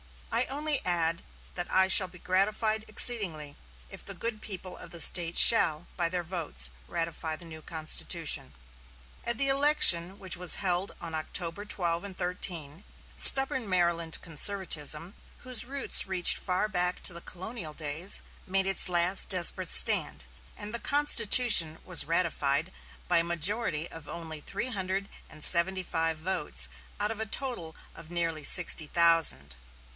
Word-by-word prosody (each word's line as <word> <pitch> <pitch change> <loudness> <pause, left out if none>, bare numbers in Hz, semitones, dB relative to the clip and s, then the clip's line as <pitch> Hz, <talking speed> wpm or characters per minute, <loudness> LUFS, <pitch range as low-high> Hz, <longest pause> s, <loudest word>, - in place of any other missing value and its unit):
I 235 +2 -1
only 290 +1 -3
add 170 -1 -1 0.3
that 175 -1 -5
I 190 0 +2
shall 190 0 +5
be 180 0 -16
gratified 215 +4 -1
exceedingly 180 -11 +1 0.3
if 195 - -12
the 195 - -8
good 220 +3 -6
people 185 -3 -8
of - - -13
the 170 - -8
State 170 0 +4
shall, 170 -8 +5
by 170 -1 -2
their 180 0 -3
votes, 160 - -4 0.2
ratify 165 -1 -4
the 170 - -11
new 160 -1 -11
constitution." 155 - -3 0.7
At 235 -1 -3
the 275 +2 0
election 270 - +3
which 190 -3 -1
was 180 -1 +2
held 185 0 -2
on 165 -1 -9
October 170 +4 -4
12 170 -4 -3
and 200 -2 -11
13, 175 -2 -5 0.3
stubborn 265 -4 +7
Maryland 170 -3 -1
conservatism, 165 -1 0 0.3
whose 255 -2 -1
roots 275 -4 -2
reached 185 -2 +1
far 185 +2 -3
back 180 -3 -2
to 180 - -1
the 170 - -9
colonial 185 -3 -9
days, 155 +5 +1 0.2
made 190 +1 -1
its 195 -1 -1
last 175 +2 +1
desperate 180 -3 +1
stand, 70 -1 +4 0.3
and 210 +1 -7
the 235 - -3
constitution 235 - +5
was 180 -2 0
ratified 160 -4 -2 0.4
by - - +2
a - - +1
majority 170 0 -3
of 160 -3 -13
only 160 -2 -9
three 205 - -6
hundred 195 -2 -5 0.2
and 155 -1 -6
seventy 185 +2 +5
five 165 -2 -3
votes 155 - +1 0.3
out 210 +1 -2
of 225 - -8
a 220 - -4
total 220 -10 -3 0.2
of 165 -1 -15
nearly 165 -3 -4
sixty 165 -2 +2
thousand. 165 - +2
180 Hz, 150 wpm, -27 LUFS, 165-205 Hz, 0.7 s, stubborn